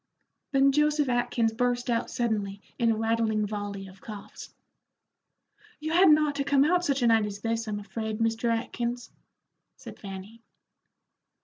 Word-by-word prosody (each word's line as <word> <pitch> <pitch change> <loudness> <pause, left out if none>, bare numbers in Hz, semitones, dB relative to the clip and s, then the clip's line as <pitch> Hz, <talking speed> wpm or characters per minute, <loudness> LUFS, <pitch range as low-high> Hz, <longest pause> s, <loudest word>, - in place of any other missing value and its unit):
Then 275 0 +4
Joseph 300 0 +2
Atkins 240 -2 +1
burst 245 +1 0
out 235 -2 0
suddenly 210 -4 -2 0.2
in 235 -1 +3
a 225 - +3
rattling 225 -1 +1
volley 205 -1 -5
of 190 0 -15
coughs. 210 -2 -9 1.3
"You 310 +1 -3
hadn't 340 -2 +7
ought 305 -1 +1
to 280 - +1
come 280 0 +3
out 355 +3 +2
such 280 -5 0
a - - +4
night 225 -2 +4
as 200 0 -7
this, 230 0 -2
I'm 210 -1 -2
afraid, 215 +2 -4
Mr. 225 +1 0
Atkins," 235 +1 -3 0.6
said - - -11
Fanny. 195 +3 -9
230 Hz, 150 wpm, -27 LUFS, 215-270 Hz, 1.3 s, hadn't